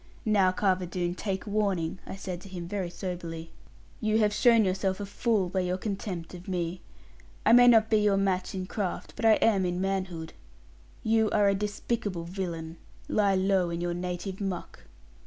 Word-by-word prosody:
'Now, 200 Hz, -4 st, +4 dB
Carver 185 Hz, -1 st, +1 dB
Doone, 175 Hz, 0 st, -2 dB
take 190 Hz, +1 st, -3 dB
warning,' 200 Hz, -5 st, -1 dB
I -, -, -5 dB
said 185 Hz, -2 st, -6 dB
to 195 Hz, -, -11 dB
him, 175 Hz, -2 st, -6 dB
very 190 Hz, -1 st, -3 dB
soberly; 170 Hz, -2 st, -6 dB, 0.5 s
'you 215 Hz, -3 st, +1 dB
have 210 Hz, -2 st, +3 dB
shown 230 Hz, -1 st, +5 dB
yourself 190 Hz, +1 st, 0 dB
a 205 Hz, -, -3 dB
fool 205 Hz, -1 st, 0 dB
by 185 Hz, +2 st, -1 dB
your 180 Hz, 0 st, 0 dB
contempt 190 Hz, -4 st, -4 dB
of 180 Hz, 0 st, -10 dB
me. 175 Hz, -1 st, -2 dB, 0.6 s
I 225 Hz, -, +6 dB
may 245 Hz, 0 st, +8 dB
not 225 Hz, -2 st, +6 dB
be 220 Hz, -, +3 dB
your 210 Hz, -2 st, +3 dB
match 190 Hz, -1 st, 0 dB
in 185 Hz, -1 st, -3 dB
craft; 190 Hz, -1 st, -4 dB
but -, -, -3 dB
I 220 Hz, -, +8 dB
am 210 Hz, -4 st, +3 dB
in 180 Hz, 0 st, -1 dB
manhood. 185 Hz, -4 st, -2 dB, 0.7 s
You 220 Hz, -1 st, +3 dB
are 205 Hz, 0 st, +3 dB
a -, -, +3 dB
despicable 205 Hz, -2 st, -2 dB
villain. 170 Hz, -2 st, -5 dB, 0.3 s
Lie 200 Hz, -2 st, +3 dB
low 190 Hz, -1 st, +2 dB
in 170 Hz, 0 st, -3 dB
your 175 Hz, 0 st, -1 dB
native 180 Hz, +2 st, -4 dB
muck.' 195 Hz, -3 st, -5 dB
190 Hz, 180 wpm, -28 LUFS, 180-205 Hz, 0.7 s, may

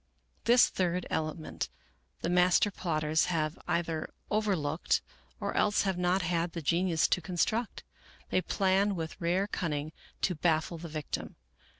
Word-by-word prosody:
This 240 Hz, +1 st, +7 dB
third 180 Hz, -1 st, -1 dB
element 155 Hz, 0 st, -3 dB, 0.5 s
the -, -, 0 dB
master 180 Hz, +3 st, +4 dB
plotters 155 Hz, -4 st, +1 dB
have 160 Hz, -3 st, -1 dB
either 165 Hz, -2 st, -1 dB, 0.2 s
overlooked 185 Hz, -8 st, +1 dB, 0.4 s
or -, -, -2 dB
else 210 Hz, 0 st, +3 dB
have 195 Hz, -2 st, 0 dB
not 180 Hz, +1 st, +2 dB
had 170 Hz, 0 st, 0 dB
the 170 Hz, -, -4 dB
genius 170 Hz, +1 st, +2 dB
to 180 Hz, -, +2 dB
construct. 195 Hz, +7 st, -1 dB, 0.5 s
They 185 Hz, -, +3 dB
plan 195 Hz, +2 st, +2 dB
with 165 Hz, +2 st, -5 dB
rare 175 Hz, +4 st, +2 dB
cunning 155 Hz, -6 st, -2 dB, 0.3 s
to 185 Hz, -, +2 dB
baffle 160 Hz, 0 st, 0 dB
the 170 Hz, 0 st, -7 dB
victim. 155 Hz, -1 st, -4 dB
175 Hz, 135 wpm, -30 LUFS, 160-185 Hz, 0.5 s, This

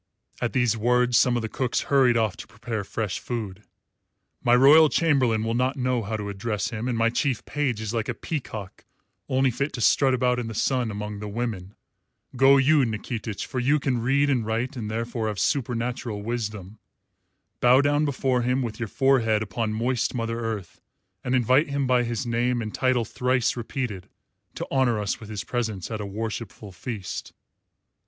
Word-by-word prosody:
(At 120 Hz, -, -1 dB
these 120 Hz, -3 st, +2 dB
words 125 Hz, +2 st, +2 dB
some 125 Hz, +1 st, +4 dB
of 120 Hz, -, -1 dB
the -, -, -1 dB
cooks 125 Hz, +2 st, -1 dB
hurried 130 Hz, -4 st, +3 dB
off 110 Hz, -4 st, +1 dB
to -, -, -9 dB
prepare 110 Hz, 0 st, -5 dB
fresh 100 Hz, -2 st, -3 dB
food.) 105 Hz, -5 st, -5 dB, 0.8 s
"My 120 Hz, 0 st, +5 dB
royal 150 Hz, +5 st, +7 dB
chamberlain 130 Hz, -10 st, +2 dB
will 115 Hz, 0 st, -1 dB
not 130 Hz, +4 st, 0 dB
know 125 Hz, -2 st, 0 dB
how 110 Hz, +1 st, -3 dB
to 105 Hz, -1 st, -5 dB
address 105 Hz, +1 st, -3 dB
him, 115 Hz, +1 st, -4 dB
and 120 Hz, -2 st, -1 dB
my 115 Hz, 0 st, +2 dB
chief 125 Hz, -1 st, -1 dB
page 135 Hz, -7 st, -1 dB
is 110 Hz, 0 st, -4 dB
like 115 Hz, -1 st, -2 dB
a 125 Hz, -, -2 dB
peacock 110 Hz, -, -6 dB, 0.5 s
only 130 Hz, 0 st, +2 dB
fit 140 Hz, +5 st, -2 dB
to 120 Hz, -, -4 dB
strut 135 Hz, +4 st, +4 dB
about 125 Hz, 0 st, +1 dB
in 120 Hz, -, -3 dB
the 110 Hz, -, -6 dB
sun 125 Hz, +1 st, +1 dB
among 105 Hz, 0 st, -5 dB
the 105 Hz, -, -5 dB
women. 105 Hz, -3 st, -4 dB, 0.6 s
Go 135 Hz, +2 st, +6 dB
you, 145 Hz, +3 st, +4 dB
Nikitich, 110 Hz, -1 st, -4 dB
for 130 Hz, -, -4 dB
you 140 Hz, +5 st, +2 dB
can 130 Hz, -4 st, -1 dB
read 140 Hz, +4 st, +2 dB
and 130 Hz, -5 st, +1 dB
write 115 Hz, +4 st, -2 dB
and 110 Hz, -4 st, -4 dB
therefore 115 Hz, 0 st, -2 dB
have 105 Hz, -2 st, -3 dB
supernatural 120 Hz, -4 st, -1 dB
wisdom. 105 Hz, -3 st, -4 dB, 0.8 s
Bow 125 Hz, +2 st, +6 dB
down 145 Hz, +1 st, +2 dB
before 130 Hz, -3 st, 0 dB
him, 125 Hz, +2 st, +1 dB
with 115 Hz, -1 st, -5 dB
your 115 Hz, -, -2 dB
forehead 115 Hz, -5 st, +2 dB
upon 110 Hz, +2 st, -2 dB
moist 120 Hz, +3 st, -1 dB
Mother 115 Hz, -1 st, -2 dB
Earth, 110 Hz, -6 st, -5 dB, 0.4 s
and 125 Hz, +1 st, 0 dB
invite 130 Hz, +4 st, +3 dB
him 140 Hz, -1 st, -1 dB
by 125 Hz, -1 st, +3 dB
his 120 Hz, +2 st, -2 dB
name 120 Hz, +1 st, 0 dB
and 110 Hz, -2 st, -4 dB
title 130 Hz, -3 st, +1 dB
thrice 125 Hz, +2 st, 0 dB
repeated 120 Hz, -5 st, -4 dB, 0.5 s
to -, -, -4 dB
honour 125 Hz, -5 st, +2 dB
us 105 Hz, -2 st, -2 dB
with 110 Hz, -, -11 dB
his 105 Hz, -2 st, -4 dB
presence 110 Hz, -5 st, -3 dB
at 110 Hz, -1 st, -3 dB
a 100 Hz, -, -4 dB
worshipful 110 Hz, 0 st, -5 dB
feast. 100 Hz, 0 st, -6 dB
120 Hz, 185 wpm, -25 LUFS, 110-130 Hz, 0.8 s, royal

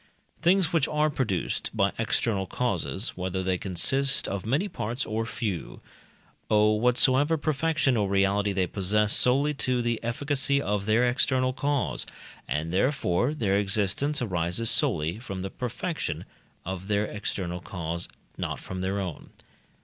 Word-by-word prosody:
Things 175 Hz, 0 st, +3 dB
which 160 Hz, -4 st, +3 dB
are 150 Hz, 0 st, +1 dB
produced 110 Hz, -11 st, -1 dB
by -, -, +3 dB
external 100 Hz, -5 st, 0 dB
causes, 100 Hz, -1 st, -2 dB
whether 95 Hz, +1 st, -2 dB
they 90 Hz, -1 st, 0 dB
consist 135 Hz, +10 st, +2 dB
of 100 Hz, +1 st, -4 dB
many 145 Hz, -, +1 dB
parts 120 Hz, -, -3 dB
or 110 Hz, +1 st, -2 dB
few, 105 Hz, -7 st, -4 dB, 0.7 s
owe 105 Hz, 0 st, +4 dB
whatsoever 130 Hz, +7 st, +4 dB
perfection 150 Hz, -3 st, +1 dB
or 105 Hz, -3 st, +1 dB
reality 100 Hz, +1 st, +2 dB
they 95 Hz, -1 st, +1 dB
possess 105 Hz, +3 st, +1 dB
solely 140 Hz, +4 st, +3 dB
to 130 Hz, -3 st, 0 dB
the 120 Hz, -1 st, 0 dB
efficacy 140 Hz, +3 st, +1 dB
of 105 Hz, -5 st, -2 dB
their 115 Hz, +3 st, +4 dB
external 130 Hz, +1 st, +1 dB
cause; 140 Hz, 0 st, -1 dB, 0.4 s
and 80 Hz, +3 st, -2 dB
therefore 120 Hz, -, +1 dB
their 100 Hz, -8 st, +1 dB
existence 105 Hz, +8 st, 0 dB
arises 90 Hz, +2 st, 0 dB
solely 80 Hz, +7 st, 0 dB
from 95 Hz, -6 st, -6 dB
the 95 Hz, -, -4 dB
perfection 140 Hz, +7 st, -4 dB, 0.4 s
of 95 Hz, +1 st, -5 dB
their 105 Hz, 0 st, +1 dB
external 95 Hz, -4 st, -4 dB
cause, 85 Hz, -1 st, -4 dB, 0.3 s
not -, -, -3 dB
from 95 Hz, 0 st, -6 dB
their 95 Hz, +2 st, -1 dB
own. 90 Hz, -6 st, -5 dB
110 Hz, 140 wpm, -27 LUFS, 95-135 Hz, 0.7 s, owe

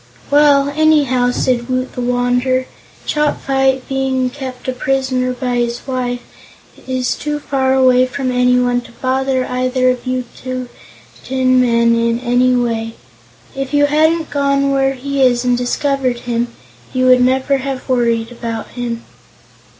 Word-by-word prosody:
"Well, 285 Hz, -1 st, +4 dB
anyhow," 290 Hz, -6 st, +3 dB
said 245 Hz, 0 st, -1 dB
Woot 255 Hz, 0 st, -2 dB
the 250 Hz, -, -4 dB
Wanderer, 245 Hz, +1 st, +1 dB, 0.4 s
"Chopfyt, 270 Hz, -3 st, 0 dB
being 265 Hz, -1 st, -1 dB
kept 260 Hz, -2 st, -8 dB
a -, -, +1 dB
prisoner 260 Hz, -1 st, -1 dB
by 250 Hz, -1 st, -2 dB
his 240 Hz, 0 st, -2 dB
wife, 250 Hz, -2 st, -3 dB, 0.7 s
is 255 Hz, -1 st, -1 dB
too 295 Hz, 0 st, -3 dB
far 265 Hz, -2 st, 0 dB
away 255 Hz, -1 st, +4 dB
from 255 Hz, 0 st, -3 dB
anyone 250 Hz, 0 st, +2 dB
to 240 Hz, -, -15 dB
bother 260 Hz, +1 st, -1 dB
either 255 Hz, 0 st, +1 dB
of 250 Hz, 0 st, -6 dB
you 255 Hz, 0 st, -1 dB
tin 255 Hz, -1 st, -5 dB, 0.9 s
men 235 Hz, -1 st, +3 dB
in 230 Hz, 0 st, +1 dB
any 250 Hz, +1 st, +2 dB
way. 225 Hz, -2 st, -1 dB, 0.6 s
If 270 Hz, +1 st, -3 dB
you 290 Hz, 0 st, +5 dB
hadn't 315 Hz, +2 st, +1 dB
gone 280 Hz, -1 st, +1 dB
where 270 Hz, 0 st, +1 dB
he 280 Hz, +2 st, -3 dB
is 250 Hz, -1 st, +3 dB
and 245 Hz, 0 st, +3 dB
discovered 255 Hz, 0 st, -1 dB
him, 240 Hz, 0 st, -1 dB, 0.5 s
you 255 Hz, 0 st, +1 dB
would 255 Hz, 0 st, +6 dB
never 260 Hz, +2 st, +2 dB
have 270 Hz, -1 st, -5 dB
worried 235 Hz, -2 st, 0 dB
about 230 Hz, -2 st, -5 dB
him." 240 Hz, -2 st, -5 dB
255 Hz, 140 wpm, -16 LUFS, 245-270 Hz, 0.9 s, would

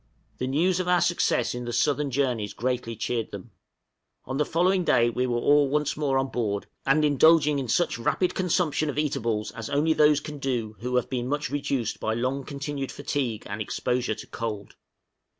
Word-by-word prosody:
The 130 Hz, -, -1 dB
news 170 Hz, +7 st, +2 dB
of 185 Hz, -, -2 dB
our 180 Hz, 0 st, +4 dB
success 170 Hz, -9 st, +1 dB
in 125 Hz, 0 st, -5 dB
the 120 Hz, -, -3 dB
southern 145 Hz, +4 st, +1 dB
journeys 120 Hz, -6 st, -1 dB
greatly 125 Hz, -1 st, -2 dB
cheered 115 Hz, +1 st, -2 dB
them. 100 Hz, +3 st, -9 dB, 0.7 s
On 130 Hz, +1 st, -3 dB
the 150 Hz, -, +2 dB
following 180 Hz, +3 st, +2 dB
day 120 Hz, -7 st, +3 dB
we 125 Hz, +2 st, -1 dB
were 120 Hz, -1 st, 0 dB
all 145 Hz, +3 st, +4 dB
once 150 Hz, +1 st, 0 dB
more 145 Hz, -3 st, 0 dB
on 135 Hz, 0 st, 0 dB
board, 105 Hz, -5 st, -2 dB, 0.2 s
and 150 Hz, +3 st, +4 dB
indulging 150 Hz, 0 st, +5 dB
in 130 Hz, -, -3 dB
such 140 Hz, +2 st, +1 dB
rapid 180 Hz, +10 st, +1 dB
consumption 165 Hz, -4 st, 0 dB
of 145 Hz, -, -4 dB
eatables 120 Hz, -8 st, -1 dB
as 115 Hz, -1 st, -7 dB
only 150 Hz, +3 st, +2 dB
those 150 Hz, -1 st, +4 dB
can 150 Hz, -1 st, -8 dB
do 120 Hz, -5 st, -2 dB
who 125 Hz, +2 st, -3 dB
have 125 Hz, -, +1 dB
been 125 Hz, -2 st, -3 dB
much 145 Hz, -1 st, -2 dB
reduced 140 Hz, -5 st, -2 dB
by 110 Hz, -, -1 dB
long 130 Hz, +4 st, -1 dB
continued 140 Hz, -1 st, -4 dB
fatigue 135 Hz, -6 st, -3 dB
and 100 Hz, +2 st, -5 dB
exposure 125 Hz, +1 st, -1 dB
to 110 Hz, -, -9 dB
cold. 105 Hz, -4 st, -5 dB
135 Hz, 190 wpm, -26 LUFS, 120-150 Hz, 0.7 s, indulging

